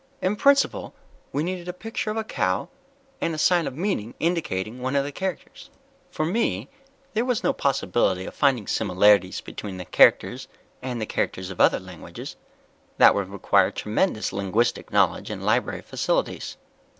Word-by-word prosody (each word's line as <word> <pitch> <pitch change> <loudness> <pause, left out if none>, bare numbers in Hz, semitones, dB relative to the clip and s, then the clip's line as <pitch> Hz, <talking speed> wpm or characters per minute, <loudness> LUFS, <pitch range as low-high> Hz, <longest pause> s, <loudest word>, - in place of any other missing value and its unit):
In 190 +3 0
principle, 280 +5 +2 0.4
we 145 - -1
needed 180 0 -4
a 180 - -3
picture 220 +3 -4
of 215 - -2
a 220 - 0
cow, 95 - -1 0.5
and 165 - 0
a - - -6
sign 175 +1 +3
of 130 - -6
meaning 165 - -2
indicating 125 - -2
one 130 +2 -2
of 140 - +3
the 145 - -5
characters. 185 +2 -6 0.4
"For 155 - -2
me, 145 - -1 0.4
there 225 +1 +1
was 250 -3 -1
no - - +2
possibility 95 -7 0
of - - -7
finding 135 -7 +2
similarities 95 0 +3
between 100 -3 -7
the 90 - -7
characters - - +4 0.3
and 120 -4 -4
characters 95 0 -2
of 95 - -3
other - - +5
languages - - -9 0.6
that - - +8
would 100 -2 -2
require 100 -1 +2
tremendous 110 - -1
linguistic 105 +5 0
knowledge - - +2
and - - -5
library - - 0
facilities. - - -2
130 Hz, 160 wpm, -24 LUFS, -, 0.6 s, that